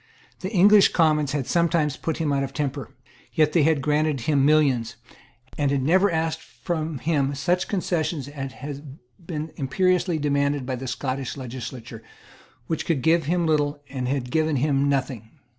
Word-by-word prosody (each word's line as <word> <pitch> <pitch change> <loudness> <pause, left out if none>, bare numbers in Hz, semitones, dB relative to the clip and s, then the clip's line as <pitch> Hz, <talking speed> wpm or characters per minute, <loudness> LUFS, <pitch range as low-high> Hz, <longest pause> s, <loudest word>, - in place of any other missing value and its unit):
The 190 - -4
English 205 0 +6
Commons 150 -4 +2
had 140 -3 -1
sometimes 170 -3 +1
put 160 - -3
him 155 -3 0
out 140 - +1
of 135 0 -6
temper. 145 -2 -3 0.4
Yet 155 -2 +2
they 170 - +4
had 150 -2 +2
granted 150 -2 +1
him 140 +2 +2
millions, 140 -6 +2 0.6
and 145 -1 +2
had 140 -1 0
never 185 +7 +4
asked 160 0 -1
from 160 -3 -4
him 140 -1 0
such 180 +6 0
concessions 170 -7 -2
as 135 -2 -6
had 140 +2 -8 0.3
been 160 -2 -5
imperiously 180 +4 +1
demanded 140 -2 0
by 130 0 -2
the 130 +1 -6
Scottish 130 +1 -3
legislature, 125 -2 -7 0.6
which 160 - -3
could 150 -7 0
give 165 -1 +3
him 170 +2 +1
little 150 -2 +1
and 130 -2 -4
had 130 -2 -2
given 155 0 +1
him 140 +1 +1
nothing. 130 -5 -2
145 Hz, 165 wpm, -24 LUFS, 135-160 Hz, 0.6 s, English